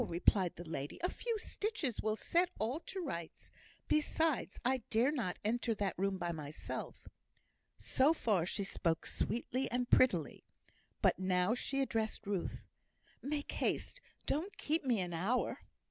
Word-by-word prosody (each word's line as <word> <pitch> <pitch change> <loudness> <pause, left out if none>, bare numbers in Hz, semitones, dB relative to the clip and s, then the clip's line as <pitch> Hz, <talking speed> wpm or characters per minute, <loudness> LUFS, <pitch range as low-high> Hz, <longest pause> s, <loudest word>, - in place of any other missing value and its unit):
replied 175 +1 +2
the 175 0 -8
lady. 145 -2 -4
"A 360 - +3
few 465 -2 -2
stitches 410 - -2
will 215 0 +1
set 345 +9 +2
all 235 +8 -1
to 385 - -4
rights. 170 - -5 0.4
Besides, 305 -1 +1
I 260 +1 +4
dare 235 +6 +4
not 225 -12 -1
enter 230 +1 +1
that 200 -3 0
room 195 +1 0
by 175 -1 -1
myself." 150 -2 -5 0.7
So 270 +4 +3
far 205 - +2
she 200 - 0
spoke 165 -4 0
sweetly 255 +2 -1
and 245 0 0
prettily. 180 - +4 0.6
But - - +4
now 185 +2 +2
she 275 +2 -1
addressed 225 -5 -1
Ruth. 195 -3 -3 0.5
"Make 290 +1 -2
haste. - - -1 0.2
Don't 345 +8 -1
keep 315 +2 0
me 245 -5 +2
an 175 -1 -3
hour." 195 +10 0
225 Hz, 145 wpm, -35 LUFS, 180-280 Hz, 0.7 s, I